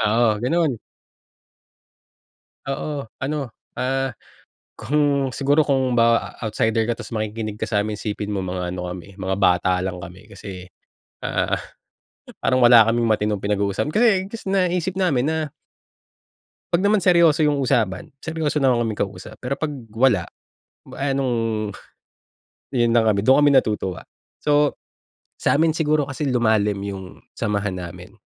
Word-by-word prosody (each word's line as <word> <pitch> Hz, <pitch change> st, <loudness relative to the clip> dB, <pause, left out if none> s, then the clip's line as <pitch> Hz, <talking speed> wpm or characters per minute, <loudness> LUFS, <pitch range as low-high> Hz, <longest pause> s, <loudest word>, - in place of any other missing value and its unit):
Oo, 110 Hz, 0 st, +3 dB
ganon! 160 Hz, +3 st, +2 dB, 2.0 s
Oo. 140 Hz, -2 st, -4 dB, 0.2 s
Ano, 145 Hz, -2 st, -2 dB, 0.3 s
ah, 135 Hz, 0 st, 0 dB, 0.7 s
kung 145 Hz, -2 st, +1 dB
siguro, 145 Hz, +2 st, +3 dB
kung 130 Hz, -3 st, +1 dB
ba 115 Hz, 0 st, +2 dB
outsider 110 Hz, 0 st, 0 dB
ka, 120 Hz, -, 0 dB
tas -, -, -10 dB
makikinig 110 Hz, -1 st, -4 dB
ka -, -, -2 dB
sa'min 105 Hz, -1 st, -1 dB
isipin 105 Hz, -1 st, -4 dB
mo 100 Hz, -, -1 dB
mga 90 Hz, -1 st, -3 dB
ano 90 Hz, 0 st, -4 dB
kami 90 Hz, +2 st, -9 dB
mga 95 Hz, 0 st, -1 dB
bata 90 Hz, -1 st, +3 dB
lang 90 Hz, -1 st, -3 dB
kami. 90 Hz, +2 st, -11 dB
Kasi, 95 Hz, -1 st, -8 dB, 0.6 s
ah, -, -, 0 dB, 0.9 s
parang 130 Hz, -1 st, +2 dB
wala 120 Hz, -2 st, +8 dB
kaming 115 Hz, 0 st, +1 dB
matinong 105 Hz, -2 st, +1 dB
pinag-uusapan. 100 Hz, +7 st, -1 dB
Kasi, 235 Hz, +2 st, +5 dB, 0.2 s
gus 230 Hz, -, -7 dB
naisip 180 Hz, -1 st, 0 dB
namin 150 Hz, -10 st, +2 dB
na 160 Hz, -, 0 dB, 1.4 s
'pag 180 Hz, +4 st, +3 dB
naman 210 Hz, -1 st, +3 dB
seryoso 170 Hz, -3 st, +5 dB
yung 150 Hz, -1 st, +2 dB
usapan, 115 Hz, -8 st, 0 dB, 0.2 s
seryoso 155 Hz, -3 st, -1 dB
naman 120 Hz, -3 st, +3 dB
kaming 110 Hz, -2 st, -2 dB
kausap. 100 Hz, +1 st, -6 dB
Pero 135 Hz, +2 st, -2 dB
pag 150 Hz, -2 st, -2 dB, 0.2 s
wala, 110 Hz, -4 st, +3 dB, 0.7 s
eh 140 Hz, 0 st, -1 dB
anong 115 Hz, -5 st, -1 dB, 1.0 s
yun 120 Hz, -2 st, +1 dB
lang 115 Hz, -1 st, +4 dB
kami, 100 Hz, -1 st, +1 dB
dun 135 Hz, +4 st, +6 dB
kami 145 Hz, -2 st, +5 dB
natutuwa. 105 Hz, -7 st, 0 dB, 0.3 s
So, 145 Hz, -1 st, +2 dB, 0.6 s
sa'min 160 Hz, +2 st, +3 dB
siguro 155 Hz, -2 st, +1 dB
kasi 140 Hz, +1 st, -4 dB
lumalim 110 Hz, -5 st, +2 dB
yung 95 Hz, -2 st, -7 dB
samahan 100 Hz, -3 st, -2 dB
namin. 90 Hz, +1 st, -9 dB
120 Hz, 135 wpm, -22 LUFS, 105-145 Hz, 2.0 s, wala